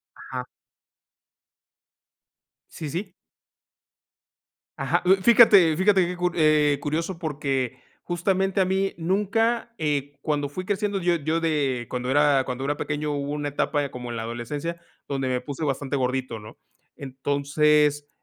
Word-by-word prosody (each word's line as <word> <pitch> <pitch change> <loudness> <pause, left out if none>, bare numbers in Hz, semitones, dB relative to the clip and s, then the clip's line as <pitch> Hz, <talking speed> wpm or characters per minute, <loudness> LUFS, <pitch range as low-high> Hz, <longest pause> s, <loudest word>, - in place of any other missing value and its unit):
Ajá. 130 -1 -6 2.2
Sí, 155 - -7
sí. 180 +4 -4 1.7
Ajá, - - 0
mm, 185 +1 +6
fíjate, 205 -8 +7
fíjate 190 0 +4
que 180 +1 -4
cu 180 0 0
eh, 150 -3 +3
curioso, 165 +4 -2
porque 135 -6 -2 0.3
justamente 190 +2 0
a - - +5
mí 190 +1 0
nunca, 225 +7 0
eh, 145 -2 -2
cuando 145 -2 -1
fui 185 +6 -6
creciendo 205 0 -1
yo 175 -1 +2
yo 160 +1 -1
de 140 -7 0
cuando 125 0 -3
era 145 -1 +4
cuando 125 +1 -4
era 145 +1 -1
pequeño 145 +1 -2
hubo 145 0 -3
una 150 0 -2
etapa 145 0 -1
como 125 -1 -7
en 120 - -4
la 115 - -3
adolescencia 140 +9 -5 0.3
donde 135 -2 -1
me 125 -1 0
puse 140 +4 -5
bastante 140 0 -2
gordito, 130 -2 -2
¿no? 105 0 -12 0.4
Entonces 145 +2 +1
150 Hz, 140 wpm, -25 LUFS, 135-175 Hz, 2.2 s, fíjate